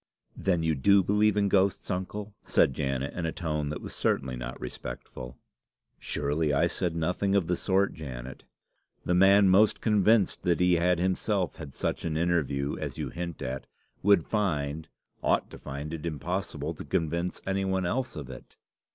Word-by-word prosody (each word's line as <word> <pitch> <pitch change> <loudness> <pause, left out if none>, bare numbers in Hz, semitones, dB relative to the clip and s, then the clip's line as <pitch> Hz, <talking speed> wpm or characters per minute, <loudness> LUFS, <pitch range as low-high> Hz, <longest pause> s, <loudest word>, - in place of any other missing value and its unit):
"Then 90 -4 0
you 80 -1 +2
do 100 +8 +4
believe 105 +2 +3
in 100 -1 +3
ghosts, 95 -1 +2
uncle?" 100 +3 -4
said 65 - +3
Janet, 70 0 -2
in 85 -2 -2
a - - -1
tone 75 -4 -2
that 75 - -5
certainly 65 -1 0
was 60 - -5
not 60 0 -6
respectful. 60 0 -7 0.6
"Surely 75 +1 -1
I 70 +4 +3
said 85 0 -1
nothing 90 +4 0
of 100 -4 +3
the 90 +2 0
sort, 95 +2 +1
Janet. 65 -4 -8 0.6
The 90 - +1
man 95 +2 +6
most 100 +3 +5
convinced 105 -1 +3
that 85 -1 +1
he 90 -1 +4
had 90 +1 +2
himself 95 +1 0
had 75 -5 -8
such - - -2
an 80 -2 -1
interview 75 -5 0
as - - -4
you - - -3
hint 85 -2 -5
at, 65 +1 -4 0.3
would 100 -4 +4
find 80 -7 -1 0.3
ought - - +1
to - - -10
find 70 +3 -6
it 80 +1 -4
impossible 80 -1 -3
to - - -8
convince 85 +3 -1
any 95 0 0
one 95 -1 0
else 130 +8 -1
of 75 -4 -6
it." - - -12
85 Hz, 175 wpm, -28 LUFS, 75-95 Hz, 0.6 s, man